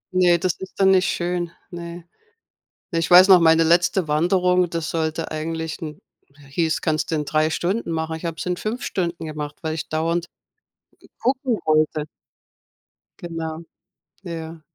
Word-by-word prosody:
Ne, 175 -1 +5
das 180 0 0
ist 190 +1 -10
dann 190 0 +5
nicht 190 0 +4
schön, 175 0 -1 0.2
ne. 170 0 -7 0.9
Ich 165 -2 0
weiß 185 +2 +8
noch, 185 -2 +9
meine 165 0 +5
letzte 170 0 +2
Wanderung, 180 +3 +2
das 165 -2 -3
sollte 160 0 -2
eigentlich 160 +1 -4
in 155 -2 -7 0.5
hieß, 160 +2 0
kannst 155 0 -1
du 160 - +1
in 150 - -1
3 155 +1 +1
Stunden 180 +4 -1
machen, 160 0 -2
ich 160 - -9
habe 165 -1 -3
es - - -5
in 180 0 -1
5 225 +4 -4
Stunden 170 -3 -2
gemacht, 150 -1 -5
weil 160 -1 -2
ich 160 - -5
dauernd 165 +2 -1 0.8
g - - -18
gucken 255 -2 0
wollte. 155 -1 +2 1.1
Genau. 165 -1 -5 0.6
Ja. 165 -2 -7
165 Hz, 160 wpm, -22 LUFS, 160-180 Hz, 1.1 s, noch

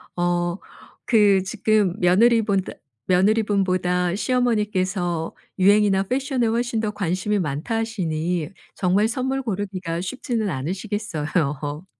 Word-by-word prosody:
어. 175 0 0 0.5
그 205 -5 +4
지금 205 -2 +1
며느리본다 200 +1 +3 0.3
며느리분보다 185 -3 +2
시어머니께서 200 -7 0 0.2
유행이나 200 0 +4
fashion에 260 +4 -1
훨씬 230 0 0
더 215 - -1
관심이 200 +1 -1
많다 160 - -2
하시니 175 -7 -2 0.3
정말 195 +3 +2
선물 265 +3 -2
고르기가 190 -7 -3
쉽지는 220 +1 -2
않으시겠어요. 155 -3 -3
195 Hz, 305 characters per minute, -23 LUFS, 175-220 Hz, 0.5 s, 그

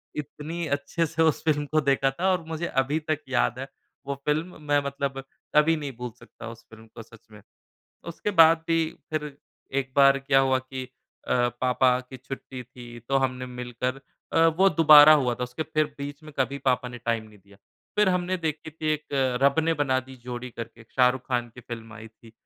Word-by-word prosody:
इतनी 155 +3 -5
अच्छे 145 +4 -1
से 165 +1 0
उस 160 -2 +1
फ़िल्म 150 -2 +1
को 155 0 +3
देखा 135 -1 +2
था 185 +7 0
और 180 -3 0
मुझे 165 +1 -3
अभी 135 +4 0
तक 155 - +1
याद 125 -1 +1
है 135 - -5 0.4
वो 140 0 -3
फ़िल्म, 155 +3 -2
मैं 145 -1 +2
मतलब 140 -1 -3 0.3
कभी 150 +2 +5
नहीं 145 -2 -5
भूल 125 0 -5
सकता - - -11
उस 115 0 -12
फ़िल्म 110 0 -15
को - - -8
सच 115 0 -19
में। 105 -1 -14 0.7
उसके 170 +5 -3
बाद 165 -3 +6
भी 165 -1 +3 0.3
फिर 150 -2 -4 0.4
एक 130 -1 -4
बार 140 0 +6
क्या 135 0 +2
हुआ 130 -1 +2
कि 130 0 -7 0.4
अ, - - +1 0.3
पापा 125 0 +3
की 130 +1 -11
छुट्टी 130 0 -8
थी, 120 -1 -12
तो 135 +4 -1
हमने 130 -1 -2
मिलकर 125 +1 -4 0.3
अ, 165 0 +5
वो 180 +5 +4
दोबारा 155 -1 +9
हुआ 125 -5 +1
था, 125 - -3
उसके 125 +5 -5
फिर 155 0 0
बीच 145 +1 -7
में 155 - -11
कभी 140 +1 0
पापा 125 -1 +1
ने 120 0 -9
टाइम 115 -1 -2
नहीं 105 -1 -18
दिया। 100 +1 -21 0.4
फिर 210 -1 +4
हमने 180 0 0
देखी 160 -2 -4
थी 155 +1 -7
एक, 155 0 -3 0.4
रब 140 +2 +4
ने 165 0 +2
बना 135 -3 +1
दी 130 0 -13
जोड़ी 125 0 -6
करके, 115 0 -9
एक 115 - -18
शाहरुख़ 125 0 +3
ख़ान 120 -2 -1
की 125 - -11
फ़िल्म 115 -1 -9
आई 110 0 -10
थी। 110 0 -19
135 Hz, 205 wpm, -26 LUFS, 125-155 Hz, 0.7 s, दोबारा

